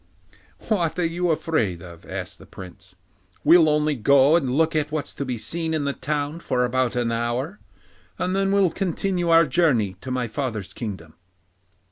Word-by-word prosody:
'What 175 Hz, -7 st, 0 dB
are 175 Hz, -, +1 dB
you 175 Hz, +2 st, -1 dB
afraid 120 Hz, -, 0 dB
of?' 85 Hz, -2 st, -12 dB
asked -, -, -6 dB
the -, -, -15 dB
Prince. 90 Hz, 0 st, -12 dB, 0.5 s
'We'll 160 Hz, 0 st, +6 dB
only 150 Hz, 0 st, +2 dB
go 140 Hz, +4 st, +4 dB
and 145 Hz, -7 st, +1 dB
look 160 Hz, +5 st, +1 dB
at 150 Hz, -1 st, 0 dB
what's 155 Hz, -2 st, -3 dB
to 140 Hz, -, -4 dB
be 125 Hz, -2 st, -3 dB
seen 160 Hz, +6 st, -3 dB
in 155 Hz, -, -1 dB
the 140 Hz, -, 0 dB
town 145 Hz, +3 st, -3 dB
for 125 Hz, -6 st, 0 dB
about 125 Hz, 0 st, 0 dB
an 120 Hz, -1 st, 0 dB
hour, 120 Hz, -, -2 dB, 0.6 s
and 185 Hz, +1 st, -1 dB
then 195 Hz, 0 st, +1 dB
we'll 195 Hz, -3 st, +3 dB
continue 180 Hz, -1 st, -1 dB
our 165 Hz, 0 st, +6 dB
journey 125 Hz, -, +1 dB
to 130 Hz, -, -7 dB
my 125 Hz, -1 st, -1 dB
father's 110 Hz, -5 st, -4 dB
kingdom. 95 Hz, -9 st, -7 dB
145 Hz, 175 wpm, -23 LUFS, 120-165 Hz, 0.6 s, We'll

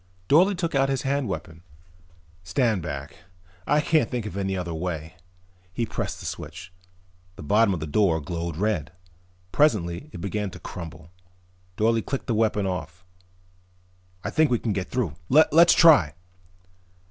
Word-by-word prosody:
Dorle 185 Hz, +7 st, +5 dB
took 170 Hz, -2 st, -2 dB
out 135 Hz, -1 st, +2 dB
his 135 Hz, -2 st, -1 dB
hand 140 Hz, -1 st, 0 dB
weapon. 80 Hz, -4 st, -6 dB, 0.8 s
"Stand 110 Hz, -, 0 dB
back. 70 Hz, -3 st, -6 dB, 0.5 s
I 150 Hz, +1 st, +3 dB
can't 155 Hz, +1 st, +2 dB
think 120 Hz, -4 st, -3 dB
of 100 Hz, -4 st, -6 dB
any 95 Hz, -1 st, -2 dB
other 85 Hz, -2 st, -4 dB
way." 80 Hz, -1 st, -4 dB, 0.6 s
He 115 Hz, -, -1 dB
pressed -, -, -4 dB
the -, -, -9 dB
switch. 90 Hz, +1 st, -7 dB, 0.6 s
The 95 Hz, -, -10 dB
bottom 105 Hz, +7 st, +3 dB
of 90 Hz, -5 st, -2 dB
the -, -, -3 dB
door 80 Hz, +1 st, +2 dB
glowed 85 Hz, +1 st, -5 dB
red. 90 Hz, -5 st, -1 dB, 0.6 s
Presently 105 Hz, -, +1 dB
it -, -, -8 dB
began 100 Hz, +2 st, -3 dB
to 90 Hz, -, -11 dB
crumble. 85 Hz, -2 st, -9 dB, 0.7 s
Dorle 115 Hz, +1 st, +2 dB
clicked 135 Hz, -, -4 dB
the 115 Hz, -, -1 dB
weapon 105 Hz, -2 st, +1 dB
off. 90 Hz, -1 st, -5 dB, 1.2 s
"I -, -, -3 dB
think 160 Hz, -2 st, +3 dB
we 120 Hz, -, +2 dB
can 110 Hz, -2 st, -2 dB
get 95 Hz, -2 st, -3 dB
through. 120 Hz, -, -1 dB, 0.2 s
Let's 160 Hz, +4 st, +6 dB
try." 145 Hz, -, +6 dB
100 Hz, 155 wpm, -25 LUFS, 85-130 Hz, 1.2 s, Let's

